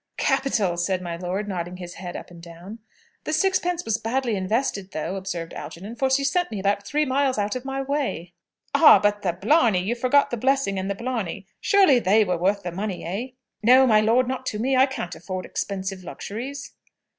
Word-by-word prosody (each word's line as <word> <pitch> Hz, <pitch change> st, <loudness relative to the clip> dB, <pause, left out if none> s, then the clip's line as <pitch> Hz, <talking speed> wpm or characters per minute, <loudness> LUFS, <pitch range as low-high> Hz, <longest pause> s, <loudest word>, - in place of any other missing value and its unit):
"Capital!" 250 Hz, -10 st, +1 dB
said 185 Hz, +2 st, 0 dB
my 175 Hz, -2 st, -5 dB
lord, 185 Hz, +4 st, -3 dB
nodding 180 Hz, -2 st, -4 dB
his 175 Hz, -1 st, -8 dB
head 180 Hz, -2 st, -8 dB
up -, -, -8 dB
and 170 Hz, -1 st, -12 dB
down. 175 Hz, +6 st, -11 dB, 0.4 s
"The -, -, -3 dB
sixpence 355 Hz, 0 st, +1 dB
was 225 Hz, 0 st, 0 dB
badly 235 Hz, 0 st, -1 dB
invested, 200 Hz, 0 st, -2 dB
though," 155 Hz, +5 st, -3 dB
observed 185 Hz, -4 st, -5 dB
Algernon, 200 Hz, +7 st, -8 dB
"for 265 Hz, +2 st, 0 dB
she 270 Hz, +1 st, +2 dB
sent 350 Hz, +6 st, +1 dB
me 215 Hz, -, -5 dB
about 200 Hz, +1 st, 0 dB
three 300 Hz, +1 st, +1 dB
miles 265 Hz, -1 st, +1 dB
out 205 Hz, +1 st, -1 dB
of 255 Hz, +1 st, -5 dB
my 270 Hz, 0 st, -3 dB
way." 265 Hz, -, -3 dB, 0.4 s
"Ah, 320 Hz, -, +8 dB
but 205 Hz, 0 st, +1 dB
the 185 Hz, -, 0 dB
blarney! 210 Hz, -, +3 dB
You 210 Hz, +5 st, -1 dB
forget 255 Hz, +4 st, +2 dB
the 240 Hz, -, -2 dB
blessing 260 Hz, -5 st, +1 dB
and 190 Hz, +1 st, -3 dB
the 200 Hz, -, -1 dB
blarney. 215 Hz, -5 st, -4 dB
Surely 385 Hz, -11 st, +5 dB
they 215 Hz, 0 st, +3 dB
were 180 Hz, -3 st, -1 dB
worth 200 Hz, +3 st, +1 dB
the 175 Hz, -, -4 dB
money, 190 Hz, 0 st, -4 dB
eh?" 230 Hz, +9 st, -5 dB, 0.3 s
"No, 255 Hz, +4 st, +6 dB
my 215 Hz, -4 st, +5 dB
lord; 235 Hz, +4 st, +3 dB
not 260 Hz, 0 st, -4 dB
to 210 Hz, -, -2 dB
me. 260 Hz, +5 st, +1 dB
I 260 Hz, +1 st, +5 dB
can't 180 Hz, -10 st, -5 dB
afford 185 Hz, +1 st, -6 dB
expensive 190 Hz, -1 st, -4 dB
luxuries." 245 Hz, +10 st, -7 dB
210 Hz, 205 wpm, -24 LUFS, 185-265 Hz, 0.4 s, Ah